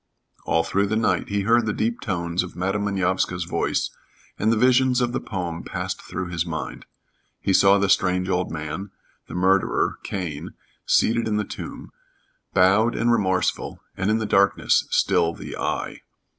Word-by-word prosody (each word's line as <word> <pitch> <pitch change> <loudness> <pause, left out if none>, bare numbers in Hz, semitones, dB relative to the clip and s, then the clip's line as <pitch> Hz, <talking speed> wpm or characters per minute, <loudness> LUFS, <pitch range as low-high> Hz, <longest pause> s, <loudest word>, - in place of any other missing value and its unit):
All 80 - +2
through 100 +3 0
the 110 - -1
night 110 - +1
he 100 0 0
heard 115 +3 +3
the 105 - 0
deep 115 +3 -1
tones 85 -3 -1
of 90 - -7
Madam 95 +3 -1
Manovska's 95 -2 0
voice, 85 0 -1 0.5
and 110 +2 +2
the 115 - +2
visions 125 +2 +4
of 120 -1 +1
the 130 - -1
poem 85 -4 -4
passed - - -4
through 90 0 -5
his 85 -2 -1
mind. 80 -2 -6 0.5
He 100 - 0
saw 100 +1 +6
the 100 0 +1
strange 90 -1 +2
old 90 -1 0
man, 80 +5 -5 0.4
the - - -8
murderer, 95 +2 +2
Cain, 85 -7 -5 0.3
seated 115 0 +3
in 105 -1 0
the 105 - 0
tomb, - - -8 0.6
bowed 100 +5 +4
and 120 +1 +2
remorseful, 95 -5 0 0.2
and 95 - -1
in 110 - +3
the 110 - -2
darkness 100 -1 +3
still 85 0 +2
the - - -8
Eye. - - -3
95 Hz, 170 wpm, -23 LUFS, 90-110 Hz, 0.6 s, saw